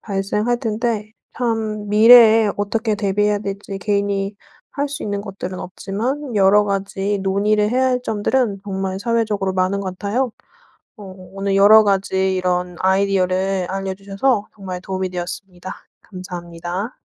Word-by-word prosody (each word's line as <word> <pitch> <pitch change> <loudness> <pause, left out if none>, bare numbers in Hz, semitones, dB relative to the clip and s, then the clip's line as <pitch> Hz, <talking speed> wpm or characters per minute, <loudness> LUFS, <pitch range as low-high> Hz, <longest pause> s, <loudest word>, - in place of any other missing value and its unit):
발생할 210 +4 -1
텐데 220 -1 -2 0.2
참 220 -3 -2
미래에 220 0 +7
어떻게 220 +2 -1
대비해야 205 0 +1
될지 200 -1 -6
개인이 200 0 -1 0.4
할 285 0 -1
수 285 +1 -6
있는 205 -1 -3
것들은 190 -2 -6
없지만 230 +9 -4
여러 205 +1 +5
가지 200 0 -2
논의를 205 +2 +1
해야 260 +3 +2
할 250 -1 0
점들은 215 -2 0
정말 190 -1 -3
사회적으로 210 -3 -1
많은 185 +1 0
것 185 -2 -5
같아요. 235 +5 -1 0.6
어 210 - -12 0.3
오늘 195 0 -1
여러 215 +2 +8
가지 190 -1 +1
이런 180 -1 -1
아이디어를 190 -1 +1
알려 195 0 -3
주셔서 200 +3 -1
정말 190 -3 -6
도움이 190 0 -3
되었습니다. 180 +1 -6 0.3
감사합니다. 180 +2 -6
200 Hz, 320 characters per minute, -20 LUFS, 190-215 Hz, 0.6 s, 여러